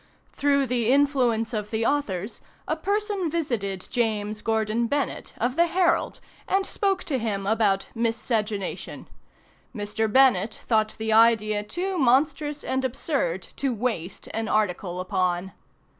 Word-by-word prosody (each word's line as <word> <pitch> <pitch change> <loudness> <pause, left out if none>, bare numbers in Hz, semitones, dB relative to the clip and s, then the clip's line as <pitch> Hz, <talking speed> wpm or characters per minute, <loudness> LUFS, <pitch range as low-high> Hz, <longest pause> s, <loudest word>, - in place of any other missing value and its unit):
Through 280 -1 +2
the 245 -2 +1
influence 250 -5 +2
of 210 -1 -3
the 225 0 -1
authors, 215 -8 -1 0.3
a - - 0
person 405 -3 -1
visited 230 - -2
James 215 -3 -1
Gordon 220 +1 0
Bennett, 285 0 -2
of 245 +3 -1
the 340 +2 +4
"Herald," 355 +1 +1 0.3
and 390 0 +1
spoke 390 -2 0
to 270 -5 -1
him 205 -4 -2
about 205 -2 +2
"Miscegenation." 225 -3 -2 0.7
Mr. 210 +1 -2
Bennett 230 -5 +4
thought 215 -2 +1
the 220 0 -1
idea 215 -2 +4
too 360 - -3
monstrous 290 +3 +2
and 260 0 -1
absurd 260 - -1
to 270 -3 0
waste 210 -6 -3
an 225 0 -2
article 180 -4 0
upon. 185 0 -1
230 Hz, 130 wpm, -25 LUFS, 210-280 Hz, 0.7 s, the